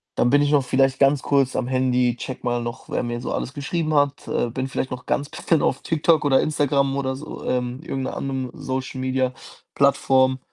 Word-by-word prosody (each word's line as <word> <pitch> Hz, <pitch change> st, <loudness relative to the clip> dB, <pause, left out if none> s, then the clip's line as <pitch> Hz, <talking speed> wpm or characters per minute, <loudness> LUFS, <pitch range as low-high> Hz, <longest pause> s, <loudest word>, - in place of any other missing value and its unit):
Dann 120 Hz, -, +2 dB
bin 145 Hz, +1 st, +5 dB
ich 145 Hz, -, +2 dB
noch 145 Hz, -2 st, +4 dB
vielleicht 135 Hz, +1 st, +2 dB
ganz 135 Hz, 0 st, +4 dB
kurz 135 Hz, -2 st, +1 dB
am 125 Hz, -, -1 dB
Handy, 125 Hz, -2 st, +1 dB
checke 130 Hz, +1 st, -7 dB
mal 120 Hz, -1 st, 0 dB
noch, 120 Hz, +2 st, -7 dB
wer -, -, -1 dB
mir 120 Hz, 0 st, -3 dB
so -, -, -3 dB
alles 130 Hz, -, -3 dB
geschrieben 155 Hz, +3 st, -2 dB
hat, 145 Hz, -1 st, +1 dB
äh, 120 Hz, -, 0 dB
bin 130 Hz, +3 st, -3 dB
vielleicht 130 Hz, 0 st, -3 dB
noch 125 Hz, -1 st, -7 dB
ganz 140 Hz, +1 st, -1 dB
bisschen 165 Hz, -4 st, 0 dB
auf 135 Hz, -, 0 dB
TikTok 160 Hz, -1 st, +2 dB
oder 135 Hz, -2 st, +4 dB
Instagram 140 Hz, -2 st, +1 dB
oder 130 Hz, -1 st, -1 dB
so, 150 Hz, +2 st, -8 dB
ähm, 125 Hz, +1 st, -2 dB
irgend 135 Hz, -5 st, -3 dB
'ner -, -, -4 dB
anderen 135 Hz, -2 st, -3 dB
Social-Media-Plattform 130 Hz, 0 st, 0 dB
130 Hz, 200 wpm, -23 LUFS, 130-140 Hz, -, bin